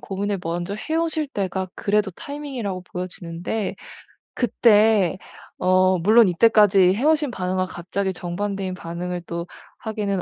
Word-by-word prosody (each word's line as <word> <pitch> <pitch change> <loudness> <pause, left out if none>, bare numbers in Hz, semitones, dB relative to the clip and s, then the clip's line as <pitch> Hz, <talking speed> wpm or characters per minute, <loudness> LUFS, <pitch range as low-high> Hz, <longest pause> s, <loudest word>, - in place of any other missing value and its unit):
고민을 200 0 -3
먼저 175 +3 -3
해 265 +9 -4
오실 320 -2 0
때가 190 -4 -3
그래도 210 0 0
타이밍이라고 250 - -5
보여지는데 180 +2 -5 0.6
그때 215 -6 +3 0.4
어 185 0 +3
물론 215 +5 +6
이때까지 195 -1 +5
해 225 +7 -3
오신 305 -3 +3
반응과 185 -2 -1
갑자기 190 +2 -3
정반대인 190 +2 -4
반응을 175 0 -5
또 170 +1 -5 0.3
하기는 210 -4 -2
195 Hz, 310 characters per minute, -23 LUFS, 180-220 Hz, 0.6 s, 물론